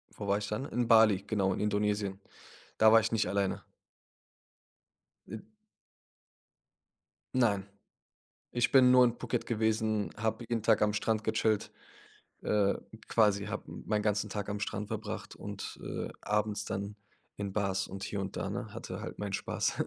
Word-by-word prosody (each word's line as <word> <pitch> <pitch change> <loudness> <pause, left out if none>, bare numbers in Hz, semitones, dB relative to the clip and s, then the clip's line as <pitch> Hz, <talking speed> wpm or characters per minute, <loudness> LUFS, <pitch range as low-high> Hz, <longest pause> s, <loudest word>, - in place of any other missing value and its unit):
wo 100 - -6
war 100 +1 +2
ich 105 - -4
dann? 105 +6 -3
In 120 -3 -1
Bali, 110 -4 +6
genau, 95 -4 +1
in - - -4
Indonesien. 105 -1 0 0.6
Da 110 0 +7
war 115 - +8
ich 110 0 -1
nicht 115 -1 +1
alleine. 100 -1 -1 1.6
Äh 110 +3 -6 2.0
Nein. 105 -6 +2 0.9
Ich 120 -1 +1
bin 130 -2 +7
nur 125 0 +8
in 120 -1 +1
Phuket - - -2
gewesen, 110 -2 0
habe 110 +2 -2
jeden 115 -2 -1
Tag 110 -2 +4
am 105 0 +3
Strand 110 +1 0
gechillt, 110 0 +1 0.7
äh 100 -2 +2 0.3
quasi 105 -3 +3
habe - - -4
meinen 105 -1 -2
ganzen 105 0 0
Tag 100 0 -4
am 105 0 -2
Strand 105 0 -3
verbracht 110 -1 -5
und, 100 0 -7
äh, - - -4
abends 105 0 0
dann 100 +1 -4 0.4
in 100 -1 -4
Bars 100 -1 0
und 95 0 -7
hier 100 0 -3
und 95 - -5
da, - - -2
ne, - - -5
hatte - - -6
halt - - -7
meinen 100 -1 -3
Spaß. - - -1
105 Hz, 155 wpm, -31 LUFS, 100-110 Hz, 2.0 s, war